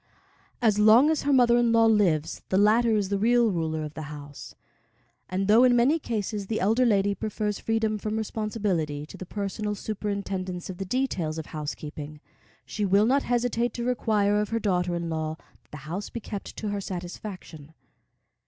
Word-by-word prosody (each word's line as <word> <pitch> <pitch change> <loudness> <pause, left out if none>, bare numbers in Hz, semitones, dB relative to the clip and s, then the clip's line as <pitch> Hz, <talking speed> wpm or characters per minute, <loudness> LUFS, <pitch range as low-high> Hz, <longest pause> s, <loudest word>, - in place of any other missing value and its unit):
As 210 -3 +3
long 225 +8 +6
as 315 - 0
her 285 - 0
mother 245 -3 +5
in 240 -1 +3
law 230 0 +5
lives, 190 -9 +2
the 190 - +2
latter 220 +3 +4
is 200 -2 -1
the 200 -1 0
real 235 +1 +3
ruler 160 -3 -2
of 150 0 -6
the 155 -2 -7
house; 145 -1 -10 0.7
and 190 +1 -1
though 220 +4 +6
in 250 -1 +5
many 265 +7 +3
cases 210 -5 -3
the 220 - -1
elder 225 +6 +3
lady 200 -2 +2
prefers 210 0 -3
freedom 220 -1 0
from 215 +1 -3
responsibility 200 -9 -2
to - - -12
the 185 - -9
personal 210 +1 -3
superintendence 195 -3 -4
of 180 - -11
the 195 - -3
details 180 -9 -1
of 160 - -5
housekeeping, 150 -1 -7 0.5
she 210 - -4
will 200 +2 +4
not 270 +4 +3
hesitate 240 -1 0
to 240 - -3
require 210 -4 +1
of 210 - -3
her 230 - -1
daughter 180 -4 0
in 170 0 -3
law 160 -1 -3 0.2
that - - -35
the 150 - -9
house 180 +6 -5
be 235 - -5
kept 205 -2 -7
to 215 - -3
her 205 0 -2
satisfaction. 175 -4 -8
205 Hz, 185 wpm, -26 LUFS, 180-225 Hz, 0.7 s, long